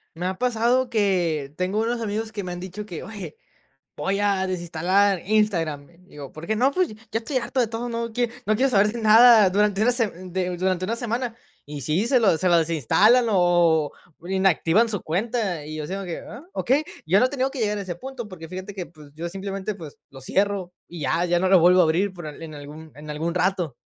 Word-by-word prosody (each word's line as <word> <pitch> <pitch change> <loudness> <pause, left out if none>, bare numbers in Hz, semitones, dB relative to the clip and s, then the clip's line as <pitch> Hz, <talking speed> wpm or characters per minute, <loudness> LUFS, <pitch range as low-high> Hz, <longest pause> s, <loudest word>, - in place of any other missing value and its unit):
Me 175 +2 -4
ha 185 0 -2
pasado 245 +2 +1
que 175 -10 0
tengo 185 +5 -1
unos 235 +1 -1
amigos 220 +1 -3
que 205 -2 -5
me 180 - -5
han 175 - -6
dicho 190 +3 -7
que: 175 -6 -7
"Oye, 195 -7 -8 0.6
voy 195 +7 -1
a 200 -2 +1
desinstalar 185 +2 +1
Instagram". 175 -9 0 0.2
Digo: 145 -5 -10
"¿Porque 170 +8 -4
no, 255 +5 +3
pues?". 365 +3 +1 0.2
"Ya 225 - 0
estoy 245 +4 -2
harto 255 +2 -2
de 240 - +3
todo, 230 +2 -4
no 230 0 -3
quie 240 +1 0 0.2
no 215 - +3
quiero 265 +5 +2
saber 210 +1 +3
nada 220 -1 +7
durante 205 +1 +2
una 245 - +4
se 235 -2 +1
de 180 0 -4
durante 185 0 0
una 225 +4 -2
semana". 235 0 -3 0.3
Y 145 -1 -7
sí, 160 - 0
se 255 0 +4
lo 195 -8 +3
se 185 +2 +1
lo 170 - +5
desinstalan, 170 - +3
o 175 -5 +3 0.3
o 170 - -13
inactivan 190 +3 +2
su 205 -4 -2
cuenta. 195 -1 -2
Y 155 +1 -7
yo 155 - -4
así 160 +5 -5
como 195 0 -4
que: 170 -2 -5
"Ah, 275 - -10
okey", 275 +5 +1 0.2
yo 185 +6 +4
no 250 - +4
he - - -10
tenido 270 -1 -1
que 270 - -7
llegar 210 -2 0
a - - -3
ese 185 -3 -5
punto 255 +4 -7
porque, 165 -5 -10
fíjate 185 +3 -7
que, 185 -3 -6
pues 150 -3 -16
yo 165 +3 -5
simplemente 195 +2 -5
pues 160 -6 -11
lo 135 -1 -13
cierro, 195 +4 -1
y 170 -2 -9
ya 145 +5 +1
ya 175 0 +1
no 185 +1 +1
lo 190 -1 +7
vuelvo 180 +2 +6
a - - +5
abrir 180 +5 +1
por 175 -3 -9
en 150 +1 -8
en 160 -2 -8
algún 150 +2 -10
en 150 +1 -11
algún 165 +3 -3
rato. 180 -5 0
190 Hz, 230 wpm, -24 LUFS, 170-220 Hz, 0.6 s, nada